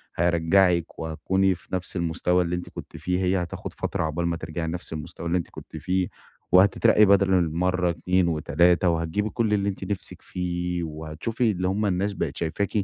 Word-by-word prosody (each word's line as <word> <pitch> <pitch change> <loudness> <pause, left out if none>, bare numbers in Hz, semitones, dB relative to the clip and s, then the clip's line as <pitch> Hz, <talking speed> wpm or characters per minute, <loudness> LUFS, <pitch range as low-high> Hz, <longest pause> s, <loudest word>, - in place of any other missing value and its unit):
هيرجّعِك 85 +1 +2
وهتكوني 95 +4 +1
في - - -19
نَفس 90 +1 -4
المستوى 90 +1 +1
اللي 85 0 -2
أنتِ 90 - -6
كنتِ - - -9
فيه، 90 0 -1
هي 90 0 +2
هتاخد 85 - -7
فترة - - -2
عقبال 80 +2 -1
ما 85 -1 -1
ترجعي 80 +1 -4
نَفس 85 0 -4
المستوى 80 +2 -6
اللي 85 +2 +2
أنتِ 85 - -4
كنتِ - - -10
فيه 90 0 0 0.5
وهتترقّي 105 +3 +6
بدل 100 -1 +4
المَرّة 90 +1 +1
2 90 +2 +1
و3 85 +3 +3
وهتجيبي 85 +5 -1
كُلّ 110 -2 0
اللي 100 -1 +1
أنتِ 95 - -6
نِفسِك 100 0 -4
فيه، 90 -1 -3
وهتشوفي 80 +10 -2
اللي 90 -2 -1
هُم 100 +3 0
الناس 100 +2 0
بقت - - -3
شايفاكِ 85 +4 -1
90 Hz, 180 wpm, -25 LUFS, 85-95 Hz, 0.5 s, وهتترقّي